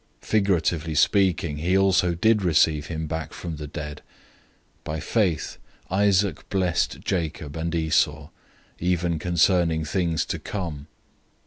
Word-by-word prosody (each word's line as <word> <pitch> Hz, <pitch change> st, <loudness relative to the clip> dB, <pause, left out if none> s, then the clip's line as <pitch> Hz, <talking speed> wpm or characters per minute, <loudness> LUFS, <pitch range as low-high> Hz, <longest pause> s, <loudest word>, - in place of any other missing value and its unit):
Figuratively 85 Hz, -6 st, +1 dB
speaking, 90 Hz, -2 st, +2 dB
he 90 Hz, +5 st, +1 dB
also 95 Hz, -2 st, +3 dB
did 110 Hz, +4 st, +3 dB
receive 80 Hz, -4 st, +2 dB
him 80 Hz, -1 st, -4 dB
back 80 Hz, 0 st, -5 dB
from 85 Hz, -3 st, -6 dB
the 75 Hz, 0 st, -6 dB
dead. 75 Hz, 0 st, -7 dB, 0.8 s
011:020 -, -, -40 dB
By 80 Hz, +1 st, -3 dB
faith, 90 Hz, 0 st, 0 dB, 0.3 s
Isaac 100 Hz, -2 st, +1 dB
blessed 90 Hz, -3 st, 0 dB
Jacob 80 Hz, -5 st, -3 dB
and 85 Hz, +1 st, -2 dB
Esau, 75 Hz, -2 st, +1 dB, 0.5 s
even 85 Hz, -2 st, 0 dB
concerning 85 Hz, -1 st, +2 dB
things 85 Hz, -1 st, 0 dB
to -, -, -4 dB
come. 80 Hz, -8 st, -5 dB
85 Hz, 125 wpm, -24 LUFS, 80-95 Hz, 0.8 s, also